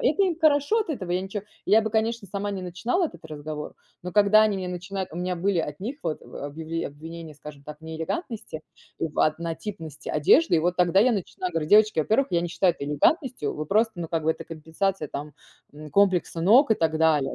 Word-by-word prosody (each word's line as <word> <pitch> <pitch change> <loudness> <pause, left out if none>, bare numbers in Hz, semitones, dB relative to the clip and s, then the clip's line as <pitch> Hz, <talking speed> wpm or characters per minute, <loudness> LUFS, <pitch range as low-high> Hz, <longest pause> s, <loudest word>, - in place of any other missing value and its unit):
это 310 +9 +2
им 355 -4 0
хорошо 300 +6 +3
от 425 - -3
этого. 190 - -4
Я 180 - +1
ничего 195 +1 -5 0.2
Я 220 +1 +5
бы 220 - -2
конечно 225 0 0
сама 200 +2 -3
не 190 -2 -4
начинала 230 - -1
этот - - -13
разговор, 150 0 -6 0.3
но 180 0 -6
когда 210 +1 +6
они 215 -2 +2
мне 185 -1 -4
начинают 185 +2 -5
У - - -8
меня 180 0 -2
были 190 +1 0
от 150 -2 -3
них 245 +9 -4
вот 160 -2 -3
объявле 160 +3 -5
обвинения, 160 +2 -9
скажем 145 -1 -11
так, 150 0 -9
в 160 - -29
неэлегантности, 160 - -5 0.4
в 155 -2 -4
однотипности 165 +1 -3
одежды 160 - +4
и - - +4
вот 175 +2 0
тогда 180 +1 +4
я 245 +3 +4
начинаю 185 -2 -3
говорить: 160 -2 -2
"Девочки, 215 -4 +5
во-первых, 220 - +2
я 170 -2 +2
не 175 - -2
считаю 175 +1 +2
это 140 - -6
элегантностью. 150 - +1
Вы 155 - -5
просто, 220 +6 +2
ну, 170 -2 -5
как 165 -2 -1
бы 160 - +3
это - - -10
компенсация 165 +1 -3
там, 145 +1 -6 0.4
м, 150 0 -10
комплекса 185 -3 +2
ног 225 - +5
и - - +3
так 160 -3 0
далее, 155 -4 +2
180 Hz, 215 wpm, -25 LUFS, 160-210 Hz, 0.4 s, когда